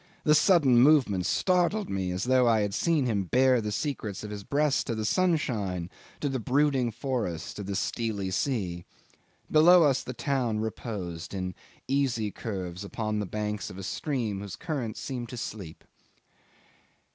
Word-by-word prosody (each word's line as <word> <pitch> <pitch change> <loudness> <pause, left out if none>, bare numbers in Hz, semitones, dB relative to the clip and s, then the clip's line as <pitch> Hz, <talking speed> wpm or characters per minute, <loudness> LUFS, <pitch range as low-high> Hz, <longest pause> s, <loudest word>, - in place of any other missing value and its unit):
The 150 - +5
sudden 150 -6 +5
movement 125 - +4
startled 185 +2 +1
me 95 -2 -2
as 90 +1 -2
though 125 -1 +3
I 110 -2 +4
had 100 -1 -1
seen 150 +3 +1
him 105 -5 0
bare 130 +4 +3
the 105 -1 -3
secrets 110 -7 -3
of 105 - -6
his 105 -1 -6
breast 145 +4 +1
to 115 - -1
the 110 0 -2
sunshine, 110 - 0 0.3
to 145 - 0
the 135 -2 -1
brooding 135 +1 +2
forests, 115 - -3
to 105 - -6
the 100 0 -4
steely 100 -1 -2
sea. 95 -6 -1 0.7
Below 170 +3 +7
us 135 -3 +3
the 130 - -6
town 125 -7 0
reposed 100 -6 -5
in 90 -1 -3 0.3
easy 130 -6 0
curves 95 -3 -5
upon 110 +1 -3
the 105 - -3
banks 105 +1 -3
of - - -10
a 95 - -7
stream 115 -3 -2
whose 100 -1 -6
current 140 -10 -4
seemed 125 -4 -5
to 125 - -7
sleep. 100 -8 -7
115 Hz, 165 wpm, -28 LUFS, 100-140 Hz, 0.7 s, Below